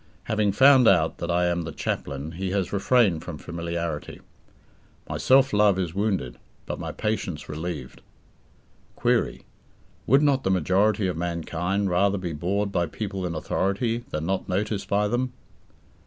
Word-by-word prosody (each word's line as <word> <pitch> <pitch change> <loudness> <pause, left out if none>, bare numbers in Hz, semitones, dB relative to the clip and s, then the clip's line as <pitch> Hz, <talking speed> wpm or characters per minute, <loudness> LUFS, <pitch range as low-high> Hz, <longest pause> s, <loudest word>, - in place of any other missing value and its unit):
Having 105 -2 +1
found 130 +1 +6
out 80 -4 +3
that 85 - -4
I 90 +1 +2
am 85 0 0
the 80 0 -5
"chaplain", 70 +1 -4
he 95 +3 -4
has 95 -1 -1
refrained 100 -4 +3
from - - -6
familiarity. 85 -2 -4 0.9
My - - -4
self 135 0 +4
love 105 -2 +4
is 90 -4 -2
wounded, 95 - -1 0.3
but - - -5
my - - -4
patience 95 -7 -3
relieved. 80 +3 -6 0.9
Query: - - 0 0.6
Would 135 +5 +5
not 140 -3 +2
the - - 0
majority 95 +3 +2
of 90 -3 -1
mankind 85 +3 -2
rather 100 +3 +2
be 90 -3 -4
bored 100 +6 -1
by 85 -3 0
people 95 -4 -4
in 85 - -4
authority 100 +8 -1
than 75 +1 -3
not 95 +2 -2
noticed 100 +2 -1
by 105 +1 +2
them? 125 +3 -1
95 Hz, 155 wpm, -25 LUFS, 85-105 Hz, 0.9 s, found